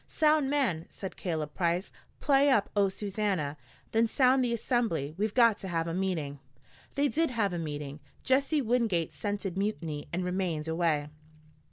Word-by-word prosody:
"Sound, 305 -3 +3
man!" 250 - 0
said 190 - -7
Caleb 155 -5 -3
Price. 175 +2 0 0.3
"Play 280 0 +4
up 220 -7 +2
Oh, 200 -1 +4
Susannah! 195 -7 -2 0.4
Then 225 +1 +3
sound 255 +2 +4
the 245 - 0
Assembly. 225 - 0
We've 210 +3 -1
got 230 -4 +5
to 195 - -6
have 165 -2 -1
a 165 - -2
meeting." 165 -7 -2 0.6
They 285 +1 +3
did 325 +3 +1
have 215 -6 0
a 175 - -2
meeting. 145 -2 -5 0.2
Jesse 275 +3 +2
Wingate 220 -9 +1
scented 195 +3 -3
mutiny 165 -8 -3
and 180 +2 -1
remained 180 -4 -1
away. 160 -3 0
195 Hz, 160 wpm, -30 LUFS, 165-240 Hz, 0.6 s, got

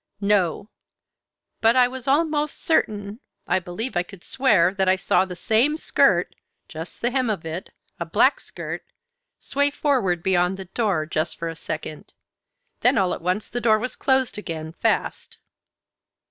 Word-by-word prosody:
"No; 200 -1 +1 0.9
but 225 +2 +5
I 250 -1 +6
was 255 0 -8
almost 300 +1 +1
certain, 210 -8 0 0.3
I - - +1
believe 200 +6 -5
I 175 - +3
could 180 0 -12
swear 210 -10 +3
that 190 -2 +1
I 185 - +5
saw 190 0 +2
the 180 -1 -7
same 230 - +2
skirt, - - +2 0.3
just 165 +1 -8
the 240 - +1
hem 255 -2 0
of 195 -7 -2
it, 160 +3 -5 0.3
a - - -2
black - - +3
skirt, - - -7 0.5
sway 285 +1 0
forward 245 - 0
beyond 180 0 +2
the 190 - -7
door, 190 -4 0
just 155 0 -2
for 170 - -4
a 165 - -6
second. - - -7 0.7
Then 250 +3 +3
all 185 -2 +2
at - - -6
once 185 +5 -1
the 245 - -4
door 220 -1 +4
was 250 +4 -4
closed 265 -4 +1
again 160 -5 -6
fast." - - -1
205 Hz, 160 wpm, -23 LUFS, 180-250 Hz, 0.9 s, I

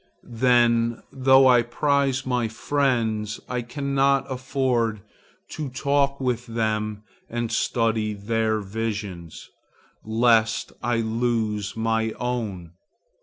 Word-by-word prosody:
Then, 120 -1 +3
though 130 0 +5
I 125 -2 +6
prize 135 +2 0
my 125 -3 0
friends, 110 -3 -1
I 125 -1 -2
cannot 140 +2 +1
afford 125 -4 -1 0.5
to 150 -3 -5
talk 140 +1 0
with 125 -2 -2
them 110 -2 -2 0.3
and 120 0 -3
study 110 -2 0
their 110 +1 -1
visions, 100 -5 -5 0.5
lest 115 0 +2
I 120 0 0
lose 110 -3 -1
my 110 0 0
own. 110 -9 -4
115 Hz, 100 wpm, -24 LUFS, 110-130 Hz, 0.5 s, I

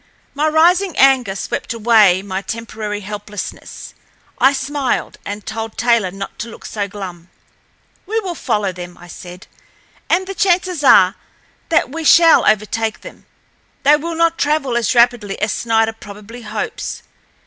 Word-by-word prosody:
My 295 +2 0
rising 345 +4 +3
anger 260 -7 +4
swept 200 - -4
away 215 -5 +4
my 190 -1 -4
temporary 215 -1 -5
helplessness. 205 +1 -8 0.5
I 265 - +5
smiled, 280 0 -2
and 205 +1 -6
told 225 0 -6
Taylor 235 -5 +2
not 195 +2 -8
to 230 - -4
look - - -12
so 205 -2 -3
glum. 185 -3 -9 0.8
"We 445 +3 0
will 370 -4 -4
follow 210 - -1
them," 175 -1 -9
I - - -14
said, 180 +1 -11 0.6
"and 370 +3 +2
the 390 - -6
chances 365 -5 +1
are 190 -8 +6 0.6
that 330 -6 +2
we 325 +2 -5
shall 330 +1 +6
overtake 215 +1 0
them. - - -13 0.6
They 290 +2 +6
will 330 +3 -4
not 335 0 +1
travel 290 -4 0
as 235 0 0
rapidly 235 -4 +2
as 210 - 0
Snider 225 -1 +1
probably 210 +2 -11
hopes. 215 -2 -5
225 Hz, 150 wpm, -18 LUFS, 205-295 Hz, 0.8 s, are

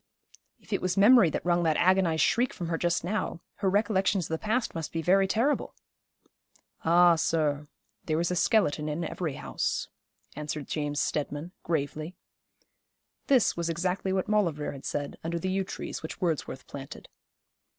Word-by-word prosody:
'If 220 - -9
it 195 - 0
was 185 0 -1
memory 205 -2 +7
that - - -4
wrung 175 0 +3
that 160 -3 +2
agonised 180 -4 +3
shriek 245 +2 +2
from 175 -4 -5
her 165 - 0
just 175 -1 +1
now, 185 -2 -2 0.2
her 195 - +1
recollections 195 -2 +1
of - - -9
the 160 0 -3
past 230 +3 0
must 165 -2 -5
be 165 0 -3
very 195 +3 +4
terrible.' 235 +9 0 1.1
'Ah, 175 +1 +6
sir, 150 -2 0 0.4
there 155 0 0
is 170 +1 0
a - - 0
skeleton 160 -5 +2
in 155 +3 -2
every 160 -2 -3
house,' 65 - -2 0.5
answered 150 -1 -4
James 145 -1 -2
Steadman, 150 +3 -2
gravely. 155 +1 -3 1.1
This 260 -5 +4
was 170 0 -2
exactly 180 +3 -1
what 190 -1 0
Maulevrier 170 -9 +1
had 135 -1 -10
said 145 -1 -4
under 170 +1 -2
the 185 +3 -2
yew 195 +1 0
trees 190 - -6
which 160 - -7
Wordsworth 155 -6 -2
planted. 140 0 -9
170 Hz, 165 wpm, -28 LUFS, 155-190 Hz, 1.1 s, memory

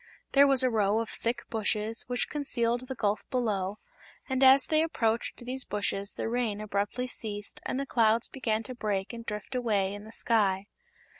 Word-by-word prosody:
There 280 0 +6
was 270 -2 +5
a 255 - +4
row 210 -1 +2
of 225 0 -1
thick 235 +1 -3
bushes, 220 0 -1
which 245 0 -1
concealed 245 -4 0
the 265 - -4
gulf 210 -2 0
below, 210 -6 -1 0.5
and 265 -1 -1
as 265 +1 +8
they 310 0 +2
approached 235 -6 -1
these 260 +1 0
bushes 200 -1 -2
the - - -3
rain 230 -3 -1
abruptly 210 +4 -2
ceased 210 -4 -4
and 260 - -1
the 275 - -2
clouds 230 -3 +2
began 225 -4 -1
to 255 - -6
break 210 -3 -2
and 230 0 -7
drift 210 +3 -6
away 210 -6 +1
in 205 0 -8
the 220 - -11
sky. 200 -5 +2
225 Hz, 180 wpm, -29 LUFS, 210-250 Hz, 0.5 s, as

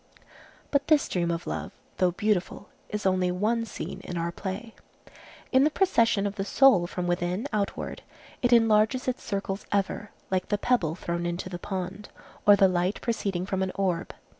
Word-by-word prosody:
But 280 -1 +1
this 310 -2 +4
dream 175 -2 -1
of 170 0 -2
love, - - -4 0.3
though 185 -1 +3
beautiful, 205 +1 -1 0.2
is 210 0 -4
only 185 -1 +2
one 215 +6 0
scene - - -6
in 175 - -5
our 170 0 -1
play. 200 +6 -6 0.8
In 260 0 +5
the 300 - +4
procession 230 - +2
of 205 +1 -3
the 195 - -1
soul 205 -5 +5
from 180 0 -4
within 175 +3 -1
outward, 205 -2 -2 0.4
it 245 - +2
enlarges 225 +2 +4
its 255 - -1
circles 195 -1 -3
ever, 200 +1 -1 0.2
like 185 -1 0
the 205 - +1
pebble 205 -9 +1
thrown 170 -1 -3
into 175 +2 -3
the 175 -1 -6
pond, 190 +2 -5 0.4
or 205 - +9
the 195 -1 +5
light 180 +2 0
proceeding 195 -6 -1
from 190 -1 -2
an 190 -1 0
orb. 185 -3 -1
195 Hz, 175 wpm, -27 LUFS, 180-220 Hz, 0.8 s, or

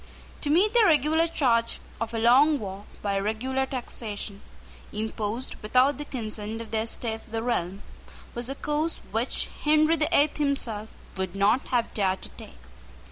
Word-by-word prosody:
To 290 - -1
meet 380 +8 +4
the 480 - +6
regular 320 -1 +4
charge 230 -7 +1 0.2
of 230 0 -2
a 230 - -3
long 265 +7 +5
war 200 -3 -7 0.2
by 200 -1 0
regular 255 +6 -1
taxation, 215 -6 -5 0.5
imposed 220 +3 -3
without 255 +6 +3
the 295 - -4
consent 220 -4 -4
of 230 -1 -8
the 220 - +1
Estates 225 0 -2
of - - -19
the 225 0 -2
realm, 195 -5 -1 0.5
was 240 +1 -3
a 270 - -3
course 300 +3 -1
which 225 +4 0 0.2
Henry 310 +2 +4
the 305 -2 0
Eighth 290 +1 +3
himself 240 -7 -1 0.3
would 190 0 -3
not 205 +6 +2
have 240 -2 0
dared 190 -2 0
to - - -4
take. - - -12
235 Hz, 165 wpm, -27 LUFS, 215-285 Hz, 0.5 s, the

